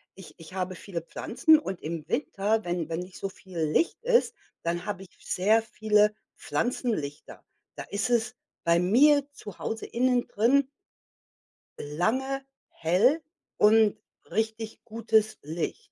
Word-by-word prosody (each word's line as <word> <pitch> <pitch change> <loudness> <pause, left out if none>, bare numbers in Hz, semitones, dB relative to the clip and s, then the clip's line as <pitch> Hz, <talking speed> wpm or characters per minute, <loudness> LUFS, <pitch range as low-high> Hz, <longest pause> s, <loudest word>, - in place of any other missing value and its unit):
ich 190 -2 -12
ich 165 +2 -12
habe 185 0 -2
viele 180 -2 -6
Pflanzen 305 - +3
und 190 - -5
im 160 0 -5
Winter, 210 +7 0
wenn 175 -2 -2
wenn 165 +1 -2
nicht 180 +1 -10
so 195 - -3
viel 185 -2 -10
Licht 160 - +1
ist, 485 0 +3 0.3
dann 170 +1 -2
habe 205 -2 -4
ich 190 - -15
sehr 215 +5 +2
viele 210 -1 +2 0.2
Pflanzenlichter. 215 - -3 0.3
Da - - -6
ist 200 +3 -2
es 240 0 +1 0.3
bei 170 0 +4
mir 280 +11 +5
zu 205 -9 -11
Hause 225 - -4
innen 250 0 +1
drin 260 +6 +3 1.1
lange 255 - -1 0.3
hell 205 - +2 0.4
und 215 0 +5 0.3
richtig 220 0 -3
gutes 220 -1 +1
Licht. 170 - -5
210 Hz, 135 wpm, -27 LUFS, 180-240 Hz, 1.1 s, mir